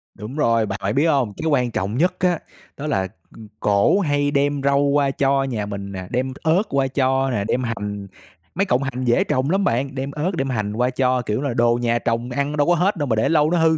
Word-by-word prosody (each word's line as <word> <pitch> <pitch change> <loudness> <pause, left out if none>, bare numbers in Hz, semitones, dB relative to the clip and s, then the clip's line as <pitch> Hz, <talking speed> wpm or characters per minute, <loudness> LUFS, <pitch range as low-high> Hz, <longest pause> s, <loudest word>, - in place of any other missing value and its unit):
Đúng 110 +7 -8
rồi, 115 -7 +2
bạn 100 0 -4
phải 100 +2 -1
biết 140 +5 +2
không, 130 -9 +1
cái 160 - -3
quan 125 -5 +1
trọng 100 +5 -2
nhất 180 +4 +2
á 180 -3 +1 0.4
đó 150 +2 -5
là 95 -9 0 0.3
ừm, 110 -2 -11
cổ 100 - +3
hay 145 -4 +1
đem 145 0 +1
rau 140 0 +3
qua 140 -1 +2
cho 135 0 +1
nhà 115 -6 -3
mình 100 -1 -6
nè, 95 -1 -6
đem 130 +2 -1
ớt 165 +6 +3
qua 135 -1 +1
cho 135 0 +1
nè, 100 -4 -1
đem 130 - 0
hành 105 -3 -4 0.5
mấy 195 +2 +1
cọng 140 -7 +1
hành 130 -1 -3
dễ 120 - +3
trồng 130 +3 0
lắm 195 +2 +1
bạn, 135 0 0
đem 135 +2 -3
ớt 150 +6 -2
đem 135 -3 -2
hành 105 -4 -2
qua 125 +3 +1
cho, 130 0 +1
kiểu 110 +2 -2
là, 140 -4 -1
đồ 120 0 +2
nhà 120 0 +1
trồng 115 +1 -2
ăn 140 +3 -2
đâu 145 - +2
có 175 - +4
hết 190 +5 +1
đâu 145 -2 -1
mà 110 - +1
để 110 - +1
lâu 155 0 +3
nó 175 - +2
hư, 160 -1 +3
135 Hz, 255 wpm, -21 LUFS, 115-145 Hz, 0.5 s, có